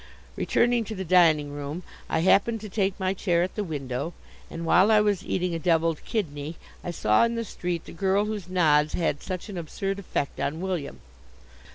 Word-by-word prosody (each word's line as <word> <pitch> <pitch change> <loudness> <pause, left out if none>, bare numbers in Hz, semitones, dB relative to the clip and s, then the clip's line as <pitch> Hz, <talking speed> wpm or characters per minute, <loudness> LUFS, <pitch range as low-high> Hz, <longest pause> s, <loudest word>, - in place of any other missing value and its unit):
Returning 240 -1 +2
to 220 - -6
the 190 -1 -4
dining 160 -5 +4
room, 145 +4 -5 0.3
I 160 - +1
happened 210 +5 +3
to 215 - -7
take 195 -1 0
my 190 0 +1
chair 175 -3 +1
at 185 - -3
the 210 - -2
window, 145 -1 -4 0.3
and 165 0 -6
while 185 +5 +5
I 215 -1 +6
was 205 -3 +1
eating 180 -1 -1
a 165 - -2
devilled 165 -1 +1
kidney 155 -7 -3 0.3
I - - -4
saw 110 -11 +3
in 235 0 +1
the 230 0 -2
street 175 -4 -4
the - - -10
girl 195 +4 +1
whose 210 -4 -5
nods 155 -4 +3
had 160 -4 0
such 185 0 -5
an 195 -4 -5
absurd 195 +4 -3
effect 160 -7 -3
on 155 +3 -2
William. 180 -6 -4
180 Hz, 195 wpm, -26 LUFS, 160-195 Hz, 0.3 s, I